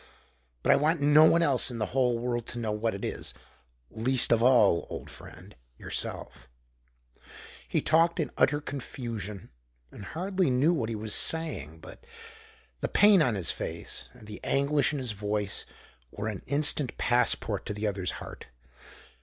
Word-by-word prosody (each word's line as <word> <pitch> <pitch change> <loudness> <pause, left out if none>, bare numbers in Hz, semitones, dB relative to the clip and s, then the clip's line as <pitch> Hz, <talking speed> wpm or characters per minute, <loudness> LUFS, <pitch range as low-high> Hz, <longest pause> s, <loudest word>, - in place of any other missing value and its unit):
But - - +3
I - - +5
want 155 +3 +1
no 150 +2 +6
one 170 +1 +4
else 140 -5 +2
in 120 - -6
the 110 - -1
whole 125 -3 +2
world 120 -1 -3
to 120 - -5
know 115 -2 -2
what 105 0 -2
it 100 - -5
is - - -4 0.6
least 120 +3 +3
of 115 -1 +4
all, 115 -9 +4
old - - -8
friend, - - -13 0.2
yourself." 60 - -5 1.2
He - - 0
talked 165 +2 +2
in 155 - -2
utter 145 +2 +2
confusion, 115 - -7 0.4
and 100 - -11
hardly 185 - -1
knew 135 +7 +2
what 115 -9 -2
he 115 - -3
was 105 0 -3
saying. 110 - 0
But - - -13 0.8
the - - -2
pain 205 -3 +5
on 120 -7 +1
his 90 -5 0
face - - -3
and - - -16
the 105 0 -9
anguish 140 +2 +1
in 150 - -3
his 130 -4 -3
voice 105 -1 -3 0.4
were 105 - -5
an 105 - -6
instant 145 -1 +2
passport 120 0 +1
to 105 - -3
the 105 +1 -4
other's 95 -4 -2
heart. - - -10
120 Hz, 165 wpm, -28 LUFS, 105-150 Hz, 1.2 s, no